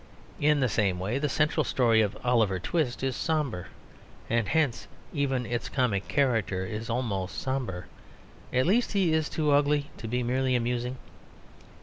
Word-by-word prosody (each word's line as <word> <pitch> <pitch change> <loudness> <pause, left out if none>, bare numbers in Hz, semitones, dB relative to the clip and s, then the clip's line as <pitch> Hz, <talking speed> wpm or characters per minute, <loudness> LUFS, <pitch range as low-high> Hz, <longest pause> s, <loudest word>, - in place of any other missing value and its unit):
In 150 -1 +3
the 130 - +3
same 100 -5 +1
way, 105 +8 -1
the 150 0 0
central 150 +2 +2
story 115 -5 +3
of 105 -2 -1
Oliver 115 -6 +2
Twist 135 - -1
is 135 -1 0
sombre; 150 - -1 0.6
and 115 -2 +2
hence 150 -6 0 0.3
even 135 -4 0
its 120 +1 -3
comic 120 -7 0
character 115 -9 +1
is 110 +4 -5
almost 105 -6 -2
sombre; 125 -10 -3 0.7
at 130 +1 +2
least 225 +7 +2
he 190 -5 +2
is 160 -1 +1
too 150 -2 0
ugly 145 0 +2
to 115 - -6
be 125 +2 -1
merely 130 +1 +1
amusing. 125 +1 -1
125 Hz, 155 wpm, -28 LUFS, 110-145 Hz, 0.7 s, In